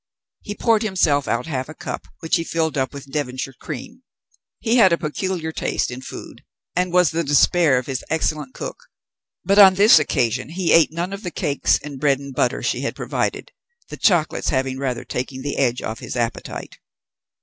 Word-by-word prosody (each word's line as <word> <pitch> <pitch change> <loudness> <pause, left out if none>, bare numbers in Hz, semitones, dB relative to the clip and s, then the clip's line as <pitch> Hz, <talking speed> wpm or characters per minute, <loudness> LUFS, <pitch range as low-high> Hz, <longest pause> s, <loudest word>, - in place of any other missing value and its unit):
He 205 - -6
poured 225 -1 +2
himself 165 -9 +1
out 120 +1 -1
half 135 -3 -4
a 155 - -9
cup, - - -6
which 160 +2 +1
he 165 - -2
filled 160 -2 -1
up 130 -2 -1
with 140 -1 -10
Devonshire 135 -2 -3
cream. 175 - -7 0.6
He 235 +1 +1
had 195 -6 +6
a 170 - +3
peculiar 165 +1 -3
taste 155 - -2
in 125 +1 -7
food, - - -10 0.3
and 180 0 0
was 180 -3 +4
the 165 +1 -1
despair 145 0 +4
of 125 - -2
his 130 -2 -4
excellent 155 -3 -1
cook, - - -7 0.6
but 200 +3 +4
on 190 -2 +9
this 200 -3 +7
occasion 125 -3 0
he 175 +1 0
ate 165 -2 +5
none 175 +4 -3
of 200 - -6
the 180 - -4
cakes 140 - +1
and 145 -3 -7
bread 140 -1 +3
and 140 0 -9
butter 125 0 0
she - - -1
had - - -3
provided, - - -3 0.4
the - - -6
chocolates 175 -6 +2
having 130 -1 -1
rather 130 -3 -3
taken 130 +1 -4
the 145 - -3
edge 125 -3 +1
off 110 - -4
his - - -6
appetite. 120 -1 -4
150 Hz, 195 wpm, -21 LUFS, 130-175 Hz, 0.6 s, on